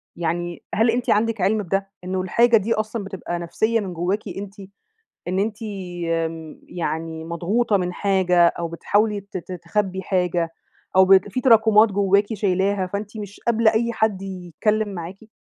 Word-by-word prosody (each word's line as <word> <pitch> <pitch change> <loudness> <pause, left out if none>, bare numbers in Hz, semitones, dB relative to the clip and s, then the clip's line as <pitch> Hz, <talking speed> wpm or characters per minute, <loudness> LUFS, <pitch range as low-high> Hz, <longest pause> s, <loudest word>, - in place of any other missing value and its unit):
يعني 175 +1 -3
هل 225 +2 +3
أنتِ 240 +1 -2
عندِك 220 0 +2
عِلم 210 +3 +2
بده، 195 +2 -2
إنه 185 +1 -2
الحاجة 230 +6 +4
دي 220 +2 0
أصلًا 215 0 -3
بتبقى 190 -3 -5
نفسية 220 +7 0
من 190 -4 -5
جواكِ 180 +5 -1
أنتِ؟ 200 0 -7 0.7
إن 185 +2 0
أنتِ 210 +1 -1 0.5
آمم، 165 -1 -3
يعني 160 -2 -4
مضغوطة 200 +7 0
من 180 -1 -2
حاجة 180 -3 +3
أو 170 0 -2
بتحاولي 205 +5 0
ت 200 0 -8
ت 180 - -9
تخبّي 190 +2 -2
حاجة 175 -3 0 0.4
أو 190 0 +7
بت 190 +1 +5
في 255 - -2
تراكمات 220 -3 +5
جوّاكِ 200 +2 +2
شايلاها، 195 -1 0
فأنتِ 205 +3 -5
مش 205 -1 -8
قابلة 230 -1 +2
أي 235 +1 +1
حَد 215 -4 0
يتكلّم 195 +3 -2
معاكِ. 190 +4 -8
195 Hz, 160 wpm, -22 LUFS, 175-215 Hz, 0.7 s, أو